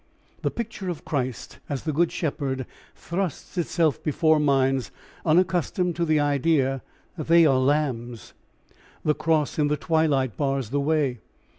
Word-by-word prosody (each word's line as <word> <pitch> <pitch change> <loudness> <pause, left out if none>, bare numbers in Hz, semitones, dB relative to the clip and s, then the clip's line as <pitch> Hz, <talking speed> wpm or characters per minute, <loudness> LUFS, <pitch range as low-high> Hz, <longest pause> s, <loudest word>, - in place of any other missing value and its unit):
The - - 0
picture 225 -5 -5
of 170 -4 -6
Christ 130 -6 -3
as 140 -3 -3
the 155 - -2
Good 170 +3 +2
Shepherd 135 -5 -2 0.3
thrusts 175 -1 -4
itself 165 -3 +1
before 155 +1 +3
minds 135 -5 +2 0.4
unaccustomed 180 +1 +2
to 170 - +1
the 155 -1 +2
idea 140 -2 +1 0.4
that 155 - -5
they 165 0 +6
are 135 -4 +4
lambs. 130 -4 -1 0.7
The 150 - +4
cross 155 -1 0
in 150 - +3
the 150 0 0
twilight 145 -7 +1
bars 135 -5 -1
the 145 0 +1
way. 140 -5 +1
150 Hz, 145 wpm, -25 LUFS, 135-165 Hz, 0.7 s, they